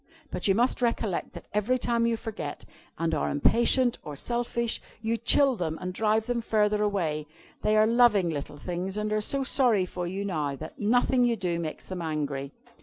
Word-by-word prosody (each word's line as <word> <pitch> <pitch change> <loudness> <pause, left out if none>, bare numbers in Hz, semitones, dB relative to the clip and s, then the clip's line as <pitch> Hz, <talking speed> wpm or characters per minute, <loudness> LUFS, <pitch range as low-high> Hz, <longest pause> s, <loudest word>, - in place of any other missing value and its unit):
But 180 - -1
you 195 - +4
must 245 +3 +1
recollect 230 -6 -1
that - - -10
every 210 +5 +1
time 235 -1 +1
you 230 -1 0
forget, 180 -11 -6 0.3
and 165 0 -1
are 155 - 0
impatient 235 - +3
or 150 - -7
selfish, 235 - -1 0.2
you 225 +1 -1
chill 260 +3 +4
them 160 -6 -3
and 180 0 -4
drive 220 +2 +1
them 245 0 -1
farther 210 -2 +1
away. 165 -8 -1 0.3
They 215 0 +2
are 215 - +6
loving 220 -6 +4
little 145 -1 -5
things, 180 +5 -4
and 210 0 -1
are 215 - +1
so 275 +5 0
sorry 240 -8 +3
for 180 -1 -5
you 195 +3 -4
now, 150 -7 -2
that 155 +4 -9
nothing 245 +4 +3
you 240 -1 +2
do 175 -5 -2
makes 160 -2 -5
them 185 -2 -4
angry. 145 -4 -3
210 Hz, 190 wpm, -27 LUFS, 170-235 Hz, 0.3 s, are